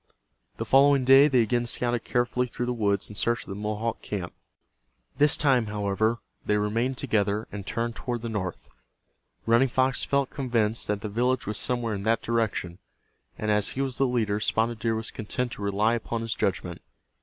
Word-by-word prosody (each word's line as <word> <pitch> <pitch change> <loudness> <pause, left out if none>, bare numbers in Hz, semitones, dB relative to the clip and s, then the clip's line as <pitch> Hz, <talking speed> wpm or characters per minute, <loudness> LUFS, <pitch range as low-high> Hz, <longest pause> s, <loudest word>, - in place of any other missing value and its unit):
The - - -3
following 140 -1 +5
day 135 +2 +8
they 130 -5 +3
again 120 +2 0
scouted 120 0 0
carefully 125 +1 0
through 120 0 -4
the 125 - -1
woods 100 -4 0
in - - -9
search 120 +3 0
of - - -15
the 95 - -5
Mohawk 105 +2 -3
camp. 95 -4 -5 0.9
This 150 0 +5
time, 130 -6 +2
however, 105 +2 0 0.3
they 105 - +1
remained 115 +5 0
together 105 0 0
and 100 -1 -7
turned 115 0 -2
toward 120 -2 -4
the - - -2
north. 95 -5 -4 0.8
Running 115 +4 +4
Fox 130 +1 +1
felt 140 -1 0
convinced 115 -5 0
that 105 -1 -1
the - - -4
village 125 +4 0
was 105 0 -2
somewhere 120 -3 -1
in 100 - -4
that 110 +3 +1
direction, 110 -6 -1 0.6
and 110 0 -1
as 105 -1 +1
he 135 - -2
was 130 -2 -2
the 135 - +4
leader 110 -4 0
Spotted 115 +1 0
Deer 115 +1 0
was 110 0 -4
content 120 +3 -3
to - - -8
rely 100 +3 +1
upon 115 0 -3
his 115 -1 -2
judgment. 90 -4 -2
115 Hz, 190 wpm, -26 LUFS, 105-125 Hz, 0.9 s, day